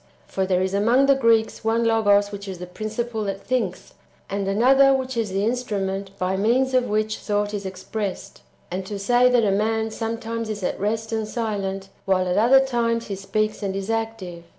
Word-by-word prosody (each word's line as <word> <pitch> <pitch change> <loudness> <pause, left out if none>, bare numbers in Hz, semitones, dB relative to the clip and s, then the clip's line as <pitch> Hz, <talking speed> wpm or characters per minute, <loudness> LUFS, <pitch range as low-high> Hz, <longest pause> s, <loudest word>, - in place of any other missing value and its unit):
^ - - -33 0.2
for 190 -1 -2
there 185 -1 +2
is 190 0 -2
among 235 +7 +3
the 275 - +6
Greeks 230 -5 +2
one 225 +1 +1
logos 205 -3 +3
which 200 0 -7
is 190 -2 -5
the 180 - -7
principle 220 +4 -4
that 195 -1 -3
thinks, 220 -8 -2 0.4
and 200 0 -2
another 265 +7 +5
which 260 -1 -3
is 225 -3 -1
the 195 +2 -1
instrument 200 -5 -2
by 185 0 -1
means 245 +7 +2
of 255 -1 +3
which 215 0 0
thought 205 0 -1
is 200 -2 -3
expressed); 190 +1 -5 0.3
and 185 +2 -3
[to 205 - -4
say] 245 +5 +4
that 245 -3 +3
a 200 - +2
man 220 +2 0
some 225 +1 -3
times 230 -1 -4
is 210 -2 -4
at - - -2
rest 220 +3 -2
and 220 -1 -1
silent, 200 -4 -3 0.2
while 185 -1 +2
at 180 - 0
other 260 +5 +6
times 230 -3 -1
he 200 - -2
speaks 215 +3 -2
and 195 -2 -2
is 195 +2 -3
active. 225 -7 -4
215 Hz, 205 wpm, -23 LUFS, 195-230 Hz, 0.4 s, the